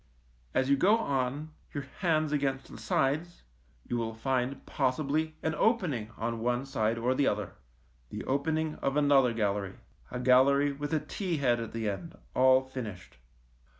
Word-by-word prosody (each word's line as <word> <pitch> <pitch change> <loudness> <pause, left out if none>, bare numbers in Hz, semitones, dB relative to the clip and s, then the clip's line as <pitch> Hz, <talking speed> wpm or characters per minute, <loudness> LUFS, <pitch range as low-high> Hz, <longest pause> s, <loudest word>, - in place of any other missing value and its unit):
As 130 0 +2
you 140 - +5
go 200 +10 +4
on, 140 - -2 0.2
your 140 - -2 0.2
hands 155 -4 +1
against 135 -2 -1
the - - -9
sides, 155 +6 0 0.4
you 120 - -1
will 115 -1 -2
find 130 +3 -1
possibly 150 +4 0
an 160 - 0
opening 155 - +1
on 115 +1 -2
one 120 +3 0
side 115 -4 0
or 120 +3 +1
the 140 +1 +2
other 105 -3 -1 0.3
— - - -35
the - - -6
opening 155 +3 -1
of 135 +1 0
another 140 -4 +5
gallery, 100 -3 -1 0.3
a 125 - -4
gallery 135 +3 +5
with 145 +2 -5
a 160 - +2
T 180 +1 -3
head 125 -4 +2
at 115 - -5
the 115 -1 -3
end, 130 - -5 0.2
all 130 0 +5
finished. 110 - -8
135 Hz, 165 wpm, -30 LUFS, 115-150 Hz, 0.4 s, you